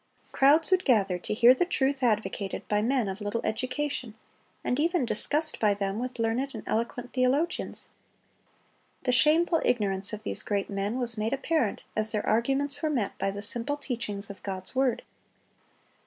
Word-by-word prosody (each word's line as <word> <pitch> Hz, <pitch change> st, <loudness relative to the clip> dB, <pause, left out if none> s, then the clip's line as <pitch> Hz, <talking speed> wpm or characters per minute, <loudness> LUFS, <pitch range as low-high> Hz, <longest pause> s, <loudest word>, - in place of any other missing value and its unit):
(280) -, -, -10 dB, 0.2 s
Crowds 325 Hz, +3 st, +3 dB
would 370 Hz, -1 st, +3 dB
gather 195 Hz, -8 st, +2 dB
to -, -, -6 dB
hear 240 Hz, +2 st, +7 dB
the 260 Hz, -, +1 dB
truth 275 Hz, -5 st, 0 dB
advocated 210 Hz, -4 st, -1 dB
by 210 Hz, 0 st, +1 dB
men 245 Hz, 0 st, +1 dB
of 195 Hz, +2 st, -5 dB
little 205 Hz, +3 st, -2 dB
education, 255 Hz, -1 st, -2 dB, 0.5 s
and 250 Hz, -, -1 dB
even 335 Hz, -2 st, +1 dB
discussed 300 Hz, +7 st, +2 dB
by 210 Hz, -2 st, +3 dB
them 200 Hz, +1 st, -3 dB
with 250 Hz, +1 st, -5 dB
learned 235 Hz, +4 st, -1 dB
and 220 Hz, -, -7 dB
eloquent 240 Hz, +2 st, -3 dB
theologians. 270 Hz, +7 st, 0 dB, 1.1 s
The 250 Hz, -, +1 dB
shameful 320 Hz, +6 st, +3 dB
ignorance 195 Hz, -4 st, 0 dB
of 215 Hz, 0 st, -7 dB
these -, -, +2 dB
great 200 Hz, -1 st, -2 dB
men 200 Hz, +4 st, -2 dB
was 235 Hz, -3 st, +1 dB
made 220 Hz, +3 st, -1 dB
apparent 275 Hz, -4 st, -1 dB
as 215 Hz, 0 st, 0 dB
their 210 Hz, -, -2 dB
arguments 275 Hz, +5 st, 0 dB
were 310 Hz, -, 0 dB
met 245 Hz, -9 st, -1 dB
by 195 Hz, -, 0 dB
the 200 Hz, +1 st, -5 dB
simple 240 Hz, +6 st, 0 dB
teachings 215 Hz, -7 st, -4 dB
of 200 Hz, -, -13 dB
God's 190 Hz, -2 st, -5 dB
word. 260 Hz, -2 st, +1 dB
235 Hz, 170 wpm, -27 LUFS, 210-275 Hz, 1.1 s, hear